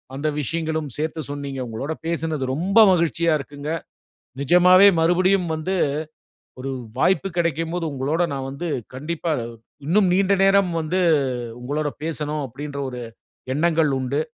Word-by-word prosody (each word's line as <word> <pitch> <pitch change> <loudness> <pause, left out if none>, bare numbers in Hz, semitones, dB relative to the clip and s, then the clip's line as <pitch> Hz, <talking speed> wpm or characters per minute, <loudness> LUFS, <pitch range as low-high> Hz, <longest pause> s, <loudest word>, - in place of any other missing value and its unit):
அந்த 150 +3 -2
விஷயங்களும் 160 -1 -2
சேர்த்து 160 +1 -2
சொன்னீங்க. 140 -2 -5
உங்களோட 135 +8 -4
பேசினது 160 -4 -2
ரொம்ப 190 +9 +2
மகிழ்ச்சியா 170 -1 +2
இருக்குங்க. 145 +2 -6 0.7
நிஜமாவே 180 +6 +6
மறுபடியும் 180 +2 +3
வந்து 185 +5 -2 0.8
ஒரு 135 +1 -4 0.3
வாய்ப்பு 190 +5 +2
கிடைக்கும் 165 0 0
போது, 175 -2 -2
உங்களோட 140 +6 -1
நான் 135 -1 -4
வந்து 165 +6 -5 0.3
கண்டிப்பா, 165 +4 -3 0.5
இன்னும் 190 +3 +3
நீண்ட 195 +1 +3
நேரம் 195 -2 +4
வந்து 175 +4 -1 0.6
உங்களோட 145 +4 -2
பேசணும் 150 -2 -3
அப்பிடீன்ற 140 +3 -6
ஒரு 125 -1 -6 0.5
எண்ணங்கள் 160 -2 +2
உண்டு. 140 +4 -1
160 Hz, 125 wpm, -22 LUFS, 145-175 Hz, 0.8 s, நிஜமாவே